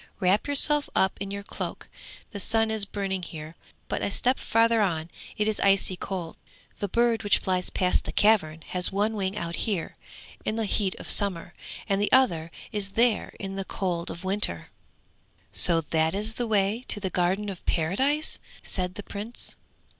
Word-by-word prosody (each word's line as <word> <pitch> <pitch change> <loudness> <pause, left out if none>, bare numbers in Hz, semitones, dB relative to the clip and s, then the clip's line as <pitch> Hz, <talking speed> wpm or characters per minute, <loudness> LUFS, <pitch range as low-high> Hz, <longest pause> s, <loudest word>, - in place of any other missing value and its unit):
Wrap 195 +5 +2
yourself 290 +1 +3
up 190 - +3
in 200 - -3
your 200 0 -5
cloak, - - -6 0.4
the 205 - -6
sun 225 +3 +1
is 215 -2 +3
burning 195 -2 -3
here, 160 -2 -8 0.3
but - - -2
a - - 0
step 250 +6 +1
further 230 0 +3
on 165 -4 -1 0.3
it 210 - +1
is 215 - 0
icy 195 -1 +3
cold. 180 -3 -5 0.4
The 205 - -1
bird 235 +2 +2
which 205 - +4
flies 185 -1 0
past 180 -1 +1
the - - -4
cavern 165 -8 +3
has 180 -1 0
one 205 +3 +1
wing 195 -1 -2
out 170 -3 -3
here 200 -7 -2 0.5
in 215 - -1
the 225 -1 -1
heat 200 -2 +1
of - - -9
summer, 180 -4 0 0.3
and 200 -1 +1
the 205 - +1
other 170 -12 +3 0.2
is 200 -3 -2
there 235 -1 +2
in 195 -1 -5
the 195 - -3
cold 175 -4 -2
of 170 - -7
winter.' 195 +3 +3 0.8
'So 165 -2 +4
that 160 +2 +2
is 215 +2 -2
the 240 +1 -2
way 210 +2 +1
to 210 - +1
the 190 -2 -3
Garden 185 +4 +1
of 190 -3 -6
Paradise!' 265 - +1 0.2
said 180 -1 -1
the 205 - -6
Prince. 210 +5 -5
200 Hz, 180 wpm, -27 LUFS, 180-220 Hz, 0.8 s, which